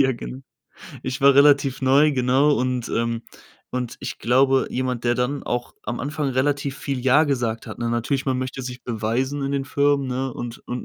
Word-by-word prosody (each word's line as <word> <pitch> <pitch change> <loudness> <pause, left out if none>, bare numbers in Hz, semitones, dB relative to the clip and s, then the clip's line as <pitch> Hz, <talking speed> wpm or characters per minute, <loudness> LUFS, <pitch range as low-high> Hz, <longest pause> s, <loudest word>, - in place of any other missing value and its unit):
ja, 130 0 +2
genau. 125 +2 -7 0.6
Ich 130 0 -4
war 140 0 +6
relativ 140 -1 +4
neu, 140 +3 +5
genau 130 +3 +3
und, 125 -2 -1
ähm 115 0 -1 0.5
und 125 -1 -4
ich - - -6
glaube, 130 +2 +3
jemand, 125 -2 -2
der 120 0 +2
dann 125 +4 -1
auch 120 0 -3
am 120 +3 -4
Anfang 145 0 -2
relativ 140 +1 0
viel 135 -3 -3
„Ja“ 140 +5 +5
gesagt 120 -5 -2
hat, - - -8
ne, 120 -1 -2
natürlich, 120 +3 -1
man 130 -2 0
möchte 130 +1 -4
sich 125 0 -7
beweisen 125 +5 -2
in 140 - -2
den 135 -1 -1
Firmen, 140 -1 +2
ne, 130 +1 -2
und 120 0 -7
und 125 0 -4
130 Hz, 195 wpm, -23 LUFS, 125-140 Hz, 0.6 s, war